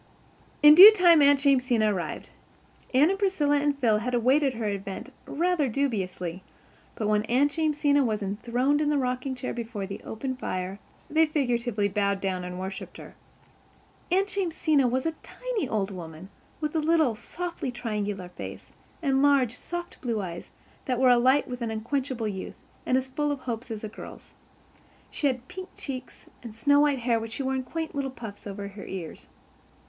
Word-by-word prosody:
In 300 0 +10
due 380 +7 +12
time 350 -6 +6
Aunt 285 -1 +5
Jamesina 250 -6 +3
arrived. 180 -3 -5 0.6
Anne 285 +7 +4
and 390 - -2
Priscilla 315 -8 +2
and 285 0 +1
Phil 225 -6 +2
had 245 +3 -2
awaited 260 +3 +3
her 225 -1 -3
advent 200 +6 -5
rather 335 -3 +1
dubiously; 190 -9 -2 0.5
but 215 - -2
when 210 0 +3
Aunt 265 +6 +2
Jamesina 295 -3 +2
was 215 -4 -1
enthroned 240 +8 0
in 295 - +1
the 295 - +2
rocking 255 0 -2
chair 255 0 -4
before 230 -4 -5
the 195 +1 -7
open 260 +4 -4
fire 185 -5 -4 0.3
they 320 +1 +3
figuratively 240 -8 0
bowed 200 0 0
down 185 -2 -2
and 180 0 -6
worshipped 190 +1 -6
her. - - -11 1.0
Aunt 385 +2 +3
Jamesina 320 -8 +1
was 255 +2 -1
a 325 - +1
tiny 485 - -4
old 205 -2 -1
woman 170 0 -9 0.3
with 300 +1 -3
a - - +3
little, 310 -5 +3
softly 335 +7 -5
triangular 210 -6 -4
face, 180 - -9 0.3
and 270 -2 +2
large, 280 -5 +4
soft 345 +6 -7
blue 235 -4 -1
eyes 175 -3 -6 0.4
that 250 -2 -1
were 260 -1 +5
alight 255 +4 +4
with 250 0 -6
unquenchable 235 +2 -2
youth, 190 -2 -5 0.3
and 255 - +3
as 260 0 -1
full 295 +3 -1
of 280 -2 -4
hopes 235 0 -5
as 220 -1 -6
a - - -3
girl's. 215 - -11 0.8
She 295 - 0
had 255 -1 -2
pink 370 0 -8
cheeks 255 -3 -7 0.2
and 230 -3 -9
snow 285 +6 +4
white 290 -2 +3
hair 235 -2 +1
which 225 0 -6
she 275 - -4
wore 265 0 -1
in 260 - -1
quaint 320 +5 -5
little 280 -1 -2
puffs 225 -6 -9
over 200 0 -6
her 200 0 -10
ears. 180 -4 -7
255 Hz, 175 wpm, -27 LUFS, 215-290 Hz, 1.0 s, due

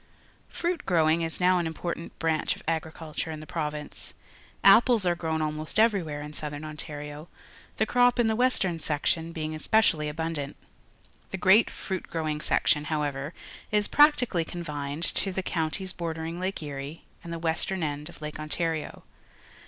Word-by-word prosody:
Fr 345 - -2
uit 355 -2 -1
g 185 - +1
rowing 160 0 +4
is 165 -1 -2
now 180 0 +4
an 165 -2 -1
jmportant 170 +1 -4
branch 160 -2 +1
of - - -15
agriculture 160 -1 -3
in 155 -1 -5
the 155 - -9
province. 150 -2 -5 0.5
Apples 220 +1 +6
are 175 - +4
grown 160 -2 -1
almost 155 +3 -3
every^vhere 180 -10 +2
in 150 - -9
Southern 150 0 -5
Ontario, 150 0 -7 0.5
the 220 - +3
crop 245 +1 +4
in 240 - +5
the 220 0 +2
western 215 -8 +2
section 160 +2 0
being 155 -1 -4
specially 160 -7 +3
abundant. 155 -2 -3 0.7
The 190 - -4
great 190 +5 +6
fruit 190 -2 -5
growing 155 -2 -2
.section, 150 -1 +2
however, 145 -1 -2 0.3
is 210 -1 +2
practically 255 - +4
confijied^ 150 -2 -2
to 195 - +1
the 190 0 -2
counties 180 +2 -1
bordering 165 0 -4
Lake 185 -2 -2
Erie 145 +2 -6 0.2
and__the 170 -1 -5
western 170 +2 0
end 150 0 -3
of - - -12
Lake 150 0 -5
Ontario. 160 +1 -3
160 Hz, 160 wpm, -28 LUFS, 150-185 Hz, 0.7 s, Apples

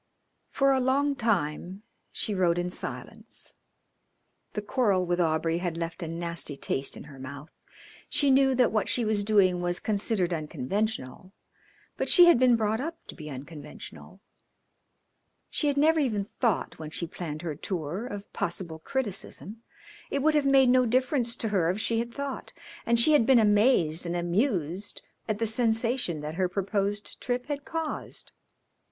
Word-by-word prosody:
For 275 0 +2
a 265 - +3
long 275 +3 +2
time 190 - -1 0.3
she 215 - -1
rode 175 -3 +2
in 175 0 -1
silence. - - -7 1.0
The 210 - -2
quarrel 205 -5 +1
with 175 0 0
Aubrey 165 0 +1
had 175 -2 -3
left 165 +1 -4
a 165 - -3
nasty 165 -3 -3
taste 135 0 -2
in - - -9
her 140 -3 -13
mouth. 140 +4 -9 0.6
She 285 -2 +3
knew 265 0 +4
that 250 -1 +3
what 215 -2 0
she 240 - +1
was 215 -1 +1
doing 195 -4 +3
was 175 0 0
considered 200 -4 0
unconventional, 165 - -3 0.6
but - - -1
she 355 - +8
had 345 -8 +6
been 250 -2 +5
brought 220 +1 0
up 330 +3 -4
to - - -8
be 155 -3 -8
unconventional. 145 +3 -10 1.3
She 300 - 0
had 285 -1 +1
never 315 +3 +4
even 215 -9 0
thought, 225 -5 -1
when 155 -1 -6
she 165 +2 -3
planned 160 -1 -6
her 165 -3 -3
tour, 175 - -4
of 205 -3 -8
possible 170 -2 -4
criticism; 220 -1 -4 0.5
it 280 - -1
would 315 0 +4
have 295 -2 +2
made 270 -2 +5
no 255 0 +4
difference 250 0 +1
to 225 - -2
her 185 -5 +2
if 185 +4 -1
she 225 +2 +1
had 235 +1 -3
thought, 280 +1 -6 0.3
and 235 0 +4
she 305 +7 +6
had 230 -7 +4
been 265 - +6
amazed 205 -7 +3
and 170 - -2
amused 180 - -1 0.2
at 215 -2 -1
the 225 - 0
sensation 225 - 0
that 150 +1 -5
her 185 - +2
proposed 200 +2 -2
trip 245 0 -2
had 285 0 -4
caused. 325 -1 -5
205 Hz, 165 wpm, -28 LUFS, 170-250 Hz, 1.3 s, she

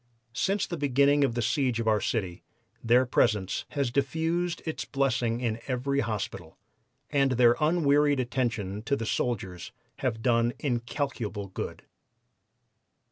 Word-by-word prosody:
Since 195 - 0
the 175 - -5
beginning 140 +1 +4
of 125 -4 +1
the 120 - 0
siege 130 -1 +1
of 115 - -2
our 110 -1 +3
city 95 -7 -2 0.4
their 120 +2 +4
presence 105 -5 +1
has 135 -4 +1
diffused 165 +6 -1
its 160 - -3
blessings 125 -3 0
in 115 -1 -1
every 140 +2 0
hospital, 100 -8 -4 0.5
and 135 -3 +3
their 120 -1 +5
unwearied 150 -3 +3
attentions 115 -5 -2
to 140 - +1
the 115 - -4
soldiers 95 -7 -2 0.3
have 115 -4 -2
done 120 -1 +2
incalculable 120 -5 -3
good." 95 - -6
125 Hz, 135 wpm, -28 LUFS, 115-140 Hz, 0.5 s, their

